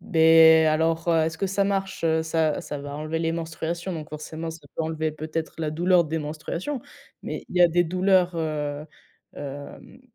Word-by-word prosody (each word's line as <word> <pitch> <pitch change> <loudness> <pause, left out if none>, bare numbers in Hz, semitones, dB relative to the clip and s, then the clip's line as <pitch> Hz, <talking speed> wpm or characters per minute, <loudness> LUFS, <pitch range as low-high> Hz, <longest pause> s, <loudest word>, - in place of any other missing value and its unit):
Beh 160 0 +6
et - - +3
alors, 160 +2 +1
heu, 165 -2 +4
est-ce 160 0 -3
que 195 - 0
ça 195 +1 +1
marche, 195 -1 -2
heu? 160 0 +2
Ça 160 -1 0
ça 145 - -6
va 145 0 -7
enlever 155 +2 -3
les 165 0 0
menstruations, 165 +2 -4
donc 155 -2 -6
forcément 155 +2 -6
ça 160 - -9 0.2
peut - - 0
enlever 160 0 -2
peut-être 155 +1 -5
la 155 -2 -1
douleur 175 +2 +3
des 160 +1 -2
menstruations. 160 - -4 0.4
Mais - - -5
il 180 - -7
y - - +4
a 175 - +7
des 175 +1 +2
douleurs, 185 +1 +2
heu, 150 -2 -3 0.5
hem, 145 - -9
160 Hz, 195 wpm, -25 LUFS, 155-170 Hz, 0.5 s, a